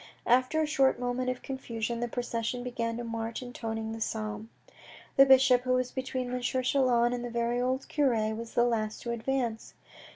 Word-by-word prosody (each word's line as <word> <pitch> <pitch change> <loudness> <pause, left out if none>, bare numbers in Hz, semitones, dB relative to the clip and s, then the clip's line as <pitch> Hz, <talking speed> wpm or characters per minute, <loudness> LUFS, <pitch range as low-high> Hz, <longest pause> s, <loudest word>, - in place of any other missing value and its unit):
After 255 +5 +3
a - - +2
short 270 -4 +2
moment 250 +1 -1
of 255 0 -4
confusion, 235 -3 -4
the 240 - -1
procession 240 0 -3
began 230 -2 -3
to 240 - -4
march 230 +1 -4
intoning 225 -2 -4
the 225 0 -6
psalm. 215 0 -3 0.7
The 275 0 +7
bishop, 265 -2 +6
who 255 0 0
was 255 0 0
between 255 -1 -3
M. 250 - -2
Chelan 250 -1 +2
and 245 -1 -3
a 245 - -4
very 235 +1 0
old 260 +2 -1
cure, 230 -7 +1
was 230 +1 -7
the 240 - +5
last 220 -3 -1
to 235 - -3
advance. 235 -1 -2
245 Hz, 185 wpm, -29 LUFS, 230-255 Hz, 0.7 s, The